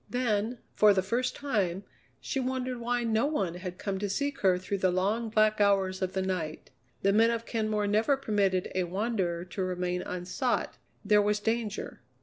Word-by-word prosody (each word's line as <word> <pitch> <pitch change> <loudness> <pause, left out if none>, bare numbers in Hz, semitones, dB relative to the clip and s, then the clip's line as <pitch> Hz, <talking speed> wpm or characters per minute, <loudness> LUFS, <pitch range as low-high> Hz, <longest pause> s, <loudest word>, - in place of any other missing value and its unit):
Then, 235 -1 0 0.2
for 210 -1 +5
the 190 - +2
first 240 +6 -1
time, 205 -10 -1 0.4
she 270 - -3
wondered 255 -1 -2
why 240 +1 -1
no 225 +3 +2
one 195 - -1
had 180 0 -6
come 195 -1 -3
to 205 0 -2
seek 280 +7 -2
her 185 -2 +3
through 195 +2 -3
the 185 - +3
long, 205 +6 0
black 215 -1 +3
hours 195 -2 +2
of 185 0 -1
the 190 - 0
night. 165 -7 -3 0.3
The 200 0 +4
men 225 +2 +5
of 230 0 -2
Kenmore 215 -3 -1
never 220 +7 +2
permitted 200 -7 0
a 185 -1 0
wanderer 185 -2 -1
to 185 +2 -4
remain 180 -1 -1
unsought; 180 +9 -2 0.3
there 210 0 +5
was 210 +1 +1
danger. 220 -1 -2
205 Hz, 180 wpm, -29 LUFS, 185-230 Hz, 0.4 s, for